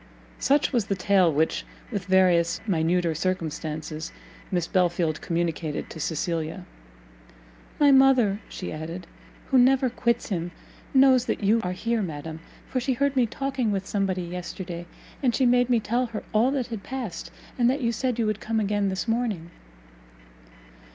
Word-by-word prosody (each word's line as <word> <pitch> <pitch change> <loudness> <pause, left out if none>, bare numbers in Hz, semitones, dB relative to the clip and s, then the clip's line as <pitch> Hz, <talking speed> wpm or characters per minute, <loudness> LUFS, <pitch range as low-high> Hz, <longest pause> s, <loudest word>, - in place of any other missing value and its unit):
Such 285 +1 +2
was 235 -5 +2
the 195 - 0
tale 185 -2 +3
which, 155 +2 +1 0.3
with 200 -5 -3
various 180 -3 +3
minuter 170 -2 +1
circumstances, 160 -2 -3 0.4
Miss 175 -3 0
Belfield 175 -3 +1
communicated 165 -3 -2
to 160 - -8
Cecilia. 160 +2 -2 1.1
"My 290 -1 +6
mother," 260 -7 +5
she 180 - -6
added, 165 +3 -6 0.5
"who 265 - +6
never 255 0 +4
quits 235 0 0
him, 175 -3 -2 0.4
knows 260 -2 +5
that - - -2
you 220 +3 +3
are 180 -2 -2
here, 230 +4 -1
madam, 160 -2 -5 0.3
for 255 - -1
she 260 +2 0
heard 280 +2 0
me 250 -3 +3
talking 265 -2 -2
with 195 -1 -2
somebody 195 -3 -1
yesterday, 175 0 -6 0.3
and 250 -4 +2
she 265 - +2
made 245 0 +4
me 240 -2 +4
tell 240 +4 0
her 225 -2 -6
all 220 +4 +4
that 270 -2 -1
had 215 - -4
passed, 245 -7 -5 0.3
and 240 0 +4
that 275 +3 0
you 235 -2 +1
said 245 +1 -1
you 230 - +1
would 215 -1 -1
come 225 0 -1
again 205 -1 0
this 190 +4 -3
morning." 225 -8 -1
200 Hz, 160 wpm, -25 LUFS, 170-245 Hz, 1.1 s, My